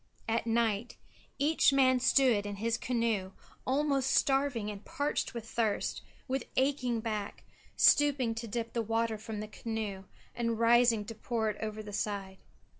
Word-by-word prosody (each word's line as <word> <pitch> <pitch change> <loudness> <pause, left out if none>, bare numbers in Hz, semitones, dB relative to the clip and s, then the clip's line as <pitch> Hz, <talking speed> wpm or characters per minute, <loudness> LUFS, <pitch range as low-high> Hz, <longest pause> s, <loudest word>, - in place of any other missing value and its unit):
At 230 +1 0
night 230 -1 0 0.4
each 290 +1 +3
man 260 -2 +4
stood 250 -5 +3
in 205 - -4
his 225 +3 -1
canoe 230 -6 -1 0.3
almost 275 0 +1
starving 270 -7 +1
and 200 -1 -9
parched 285 -3 -2
with 230 -1 -6
thirst, 225 -3 -1 0.3
with 265 -1 -2
aching 255 -4 +1
back, 215 -3 -4 0.3
stooping 275 -5 +4
to 230 +1 -6
dip 230 +1 -4
the 235 - 0
water 225 0 -1
from 220 -1 -6
the 215 - -5
canoe 215 -3 -5 0.3
and 230 -1 -1
rising 230 -1 +4
to 225 - -7
pour 220 0 -1
it 210 - -11
over 215 0 -4
the 205 -1 -9
side. 195 -1 -3
230 Hz, 155 wpm, -31 LUFS, 215-255 Hz, 0.4 s, man